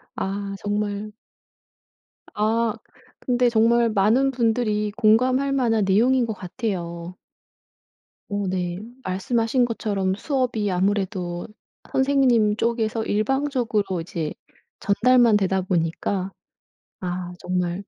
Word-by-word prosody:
아. 200 Hz, +1 st, -3 dB
정말 205 Hz, 0 st, -2 dB, 1.2 s
아. 220 Hz, +1 st, +1 dB, 0.5 s
근데 245 Hz, -1 st, +2 dB
정말 230 Hz, +1 st, +3 dB
많은 220 Hz, +6 st, +3 dB
분들이 225 Hz, -4 st, 0 dB
공감할 255 Hz, +5 st, +3 dB
만한 230 Hz, -6 st, +2 dB
내용인 240 Hz, +6 st, +3 dB
것 220 Hz, -, -2 dB
같아요. 180 Hz, -4 st, -5 dB, 1.1 s
어 200 Hz, -2 st, -2 dB
네. 180 Hz, -1 st, -2 dB, 0.2 s
말씀하신 225 Hz, +6 st, +1 dB
것처럼 200 Hz, -5 st, -1 dB
수업이 240 Hz, -5 st, -1 dB
아무래도 185 Hz, -2 st, -1 dB, 0.4 s
선생님 260 Hz, -6 st, +3 dB
쪽에서 225 Hz, -1 st, 0 dB
일방적으로 225 Hz, -, 0 dB
이제 165 Hz, -2 st, -4 dB, 0.5 s
전달만 235 Hz, +1 st, +4 dB
되다 190 Hz, -1 st, +1 dB
보니까 180 Hz, +2 st, -1 dB, 0.7 s
아 180 Hz, -1 st, -4 dB
정말. 180 Hz, +1 st, -2 dB
210 Hz, 220 characters per minute, -23 LUFS, 190-235 Hz, 1.2 s, 전달만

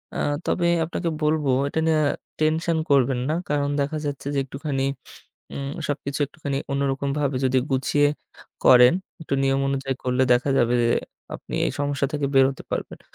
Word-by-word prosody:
আ -, -, -2 dB, 0.3 s
তবে 175 Hz, -1 st, +1 dB, 0.2 s
আপনাকে 170 Hz, +1 st, -3 dB
বলবো 150 Hz, -2 st, +1 dB, 0.2 s
এটা 150 Hz, -, -2 dB
নিয়ে 160 Hz, -1 st, +3 dB, 0.4 s
টেনশন 160 Hz, +2 st, +1 dB
করবেন 135 Hz, -2 st, +3 dB
না। -, -, +1 dB, 0.2 s
কারণ 145 Hz, -1 st, +1 dB
দেখা 145 Hz, +3 st, -2 dB
যাচ্ছে 140 Hz, -1 st, -4 dB
যে, -, -, +2 dB
একটুখানি 135 Hz, 0 st, -3 dB, 0.7 s
উ -, -, -7 dB, 0.3 s
সবকিছু 140 Hz, -1 st, -3 dB
একটুখানি 140 Hz, -1 st, -4 dB
অন্যরকম 140 Hz, 0 st, -1 dB
ভাবে 140 Hz, -2 st, 0 dB
যদি 130 Hz, 0 st, +2 dB
গুছিয় 140 Hz, +2 st, +2 dB, 0.6 s
করেন, 125 Hz, -1 st, +8 dB, 0.3 s
একটু 155 Hz, -, -4 dB
নিয়ম 135 Hz, 0 st, +2 dB
অনুযায়ী 135 Hz, -1 st, -2 dB
করলে 125 Hz, +1 st, +2 dB
দেখা 125 Hz, +3 st, +1 dB
যাবে 120 Hz, +1 st, +3 dB
যে, 115 Hz, -, +2 dB, 0.5 s
আপনি -, -, -12 dB
এই -, -, -1 dB
সমস্যা 145 Hz, -1 st, 0 dB
থেকে 145 Hz, -1 st, 0 dB
বেরোতে 135 Hz, 0 st, +3 dB
পারবেন। -, -, -4 dB
140 Hz, 160 wpm, -24 LUFS, 135-150 Hz, 0.7 s, করেন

